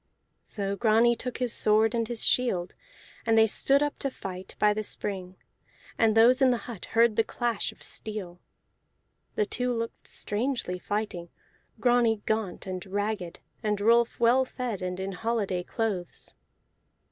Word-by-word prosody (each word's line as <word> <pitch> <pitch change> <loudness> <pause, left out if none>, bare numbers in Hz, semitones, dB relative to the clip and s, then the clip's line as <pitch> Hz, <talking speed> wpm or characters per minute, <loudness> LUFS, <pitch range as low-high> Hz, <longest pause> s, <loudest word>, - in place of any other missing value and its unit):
So 200 -2 -3
Grani 230 +2 +4
took 250 +2 -5
his 250 -3 0
sword 215 +1 +3
and 230 -1 0
his 240 -2 -1
shield, 185 -8 +1 0.5
and 225 -1 +2
they 220 - +7
stood 275 +6 +4
up 290 - -3
to 275 - -1
fight 190 -6 -8
by 210 0 +4
the 215 - -2
spring 190 -3 -3 0.6
and 225 -1 +3
those 250 +4 +6
in 265 - +6
the 245 - +2
hut 230 -7 -8
heard 230 -1 +5
the 225 - +5
clash 235 -1 -2
of - - -18
steel. 195 -5 -6 1.0
The 210 - +2
two 250 +4 0
looked 230 -1 -4
strangely 220 -4 -2
fighting, 195 -3 -3 0.5
Grani 235 -2 +2
gaunt 215 -4 -2
and 185 -1 -5
ragged, 200 -2 -3 0.2
and 210 -1 -1
Rolf 235 +3 +3
well 240 +3 +4
fed 250 -6 -4
and 180 0 -3
in 190 +1 -3
holiday 200 -2 -1
clothes. 190 -3 -4
220 Hz, 155 wpm, -27 LUFS, 195-235 Hz, 1.0 s, they